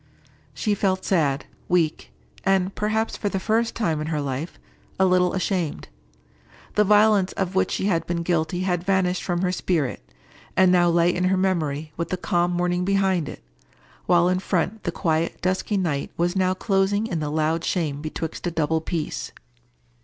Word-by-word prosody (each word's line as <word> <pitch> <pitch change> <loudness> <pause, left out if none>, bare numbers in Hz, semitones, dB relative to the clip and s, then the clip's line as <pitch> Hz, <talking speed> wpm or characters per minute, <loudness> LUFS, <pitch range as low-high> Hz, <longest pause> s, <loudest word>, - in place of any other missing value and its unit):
She 210 - 0
felt 190 -2 0
sad, 150 -6 +1 0.2
weak, 170 -3 +1 0.3
and, 195 0 +2
perhaps, 220 +1 -1
for 205 - -2
the 195 - -2
first 225 +3 0
time 165 -9 0
in 155 - -3
her 155 -2 -1
life, 140 +3 -4 0.4
a 190 - +5
little 180 -1 +3
ashamed. 180 - -2 0.8
The 210 - +4
violence 210 -2 +4
of 190 -1 -2
which 190 - +2
she - - -2
had 175 -5 0
been 170 -1 -1
guilty 170 0 0
had 180 -2 0
vanished 185 -1 +1
from 175 0 -1
her 180 - +1
spirit, 165 - -1 0.6
and 185 -1 +6
now 175 -1 +4
lay 170 +1 +3
in 180 - 0
her 190 +1 +2
memory 160 -5 -1
with 170 - -3
the 185 - -1
calm 175 0 +1
morning 180 0 0
behind 190 -4 +1
it, - - -10 0.6
while 175 0 +4
in 185 0 +1
front 190 +3 -1
the - - 0
quiet 165 -2 -1
dusky 185 +3 0
night 155 -7 -1
was 175 +2 0
now 185 -1 +2
closing 195 +2 +1
in 175 -7 -2
the 150 -1 -2
loud 160 +2 0
shame 150 -6 -1
betwixt 160 +2 -4
a - - +2
double 160 -1 0
peace. 160 -2 -4
180 Hz, 175 wpm, -24 LUFS, 165-190 Hz, 0.8 s, and